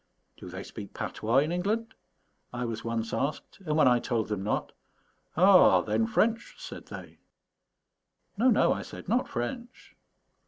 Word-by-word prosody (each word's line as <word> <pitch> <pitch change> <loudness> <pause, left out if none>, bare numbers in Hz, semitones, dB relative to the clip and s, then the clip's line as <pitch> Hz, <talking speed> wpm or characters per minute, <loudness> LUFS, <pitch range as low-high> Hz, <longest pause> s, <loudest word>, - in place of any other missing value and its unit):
"Do - - -10
they 95 +2 -7
speak 105 -3 -10
patois 115 +4 -1
in 155 - -3
England?" 210 +6 -1 0.6
I 125 0 -3
was 115 -2 -4
once 115 -1 -3
asked; 145 +2 -3
and 150 0 +1
when 150 - +5
I 125 -1 +5
told 115 -3 -2
them 105 -3 -2
not, 105 - -2 0.7
"Ah, 180 - +7
then, 110 +3 0
French?" 225 - 0
said - - -9
they. - - -10 1.2
"No, 235 +5 +4
no," 225 - +4
I - - -4
said, - - -10
"not 240 +6 +1
French." 235 - -6
125 Hz, 155 wpm, -28 LUFS, -, 1.2 s, Ah